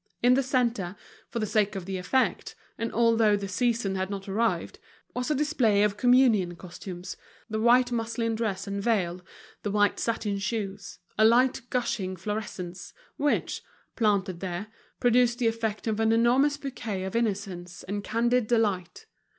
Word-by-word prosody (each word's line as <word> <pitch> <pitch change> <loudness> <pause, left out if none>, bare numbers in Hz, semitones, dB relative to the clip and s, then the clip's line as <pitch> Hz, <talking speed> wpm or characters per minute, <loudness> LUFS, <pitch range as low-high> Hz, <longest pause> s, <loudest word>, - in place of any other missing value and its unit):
In 245 +1 +6
the 270 - +4
centre, 240 -8 0 0.3
for 235 - -5
the 220 - 0
sake 210 -1 +1
of 190 -2 -5
the 190 0 -3
effect, 260 +8 0 0.2
and 230 0 -3
although 230 -2 +4
the 200 -1 -3
season 230 0 0
had 190 0 -2
not 195 -1 -5
arrived, 225 +4 -1 0.3
was 250 +2 -2
a 305 - +2
display 260 -9 +2
of 210 -1 +1
communion 240 -8 +4
costumes, 180 0 -8 0.4
the 220 - -1
white 245 +2 +4
muslin 230 0 -1
dress 215 -4 -2
and 200 0 -3
veil, 185 -5 0 0.4
the 205 - -2
white 205 0 +2
satin 215 -3 -1
shoes, 200 -1 -4 0.2
a - - +6
light 245 +4 +4
gushing 200 -7 -1
florescence, 185 -2 -5 0.2
which, 290 0 0 0.3
planted 200 -6 +1
there, 185 +3 -4 0.3
produced 245 0 +3
the 245 - -1
effect 225 -2 -2
of 220 -1 -1
an 225 0 +3
enormous 250 +6 +3
bouquet 235 -9 -4
of 190 +3 -5
innocence 195 -6 -2
and 200 +2 -4
candid 235 +2 +1
delight. 225 - 0
220 Hz, 160 wpm, -27 LUFS, 195-235 Hz, 0.4 s, In